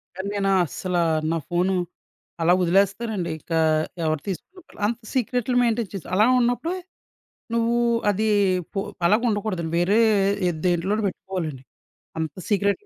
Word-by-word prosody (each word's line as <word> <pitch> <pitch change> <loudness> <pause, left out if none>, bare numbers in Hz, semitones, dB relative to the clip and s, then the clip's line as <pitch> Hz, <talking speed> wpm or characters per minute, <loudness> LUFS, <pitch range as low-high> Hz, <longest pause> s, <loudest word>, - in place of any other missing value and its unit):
కానీ, 190 +2 -4
నేనస్సల 190 -2 0 0.3
నా 165 - +1
ఫోను 180 +2 +1 0.7
అలా 170 +2 +5
వదిలేస్తానండి. 195 +1 +1
ఇక 160 - -19 0.5
ఎవరు 155 -2 0
తీసుకున్న 350 - -8
అంత 235 +1 -2
సీక్రెట్లు 250 -1 0
మెయింటైన్ 230 -3 +1
చేస్ 195 - -6
అలా 210 +3 +5
ఉన్నప్పుడే 245 +9 0 0.8
నువ్వు 235 0 +2 0.3
అది 205 +2 0 0.5
పో - - -1 0.3
అలాగ 210 +5 +4
ఉండకూడదండి. 195 -6 -2
వేరే 190 +5 +3 0.5
ఎద్ 160 -3 -3
దేంట్లోనో 185 +5 +1
పెట్టుకోవాలండి. 175 -8 -4 0.6
అంత 160 -2 -2 0.2
సీక్రెట్లు 200 - +1
195 Hz, 120 wpm, -24 LUFS, 175-225 Hz, 0.8 s, అలా